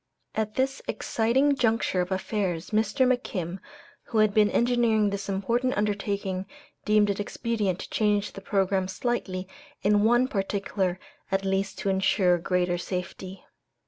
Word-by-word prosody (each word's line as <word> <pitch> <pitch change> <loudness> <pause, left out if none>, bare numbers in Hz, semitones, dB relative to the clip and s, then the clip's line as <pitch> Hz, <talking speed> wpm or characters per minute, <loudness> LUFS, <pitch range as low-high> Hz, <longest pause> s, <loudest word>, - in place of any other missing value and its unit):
At 215 -1 -2
this 265 +1 0
exciting 265 +6 +1
juncture 225 -7 +1
of 180 +1 -4
affairs, 190 -2 -2
Mr. 220 +5 +2
McKim, 195 -8 -1 0.5
who 225 - -3
had 215 -1 +4
been 210 -1 +4
engineering 235 -4 +2
this 200 0 -4
important 235 +6 0
undertaking, 200 -2 -1 0.4
deemed 210 -1 +4
it 200 - -4
expedient 205 -3 -1
to - - -8
change 210 -1 +1
the 195 - -8
programme 190 -1 +1
slightly 190 -2 -2 0.4
in 205 0 +4
one 240 +3 +4
particular 195 -3 -1 0.3
at 195 0 0
least 195 0 -1
to 200 - -2
insure 190 -2 +3
greater 180 0 0
safety. 185 +1 -6
200 Hz, 140 wpm, -27 LUFS, 190-220 Hz, 0.5 s, had